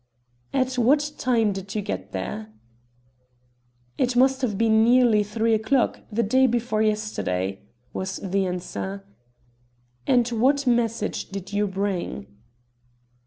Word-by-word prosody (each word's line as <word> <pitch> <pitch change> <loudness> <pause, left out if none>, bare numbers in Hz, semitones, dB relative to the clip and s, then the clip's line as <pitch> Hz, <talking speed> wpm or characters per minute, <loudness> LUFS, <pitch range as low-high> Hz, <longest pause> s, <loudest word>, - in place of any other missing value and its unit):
"At 255 -1 0
what 290 +5 +3
time 230 -4 +2
did 195 +1 -7
you 210 - -1
go 195 - -3
there?" 105 +3 -5 1.5
"It 250 -1 +1
must 265 +2 +3
have 220 -6 -1
been 220 0 +4
nearly 240 -2 +5
three 220 +2 0
o'clock, 220 +4 +1
the 230 +3 +1
day 260 +5 +4
before 235 -2 0
yesterday," 100 - -1 0.3
was 190 0 -3
the 195 0 -1
answer. 100 - -5 1.0
"And 245 -2 +4
what 265 +5 +2
message 235 -2 0
did 195 0 -7
you 205 0 +1
bring?" 190 - -3
220 Hz, 120 wpm, -24 LUFS, 195-245 Hz, 1.5 s, nearly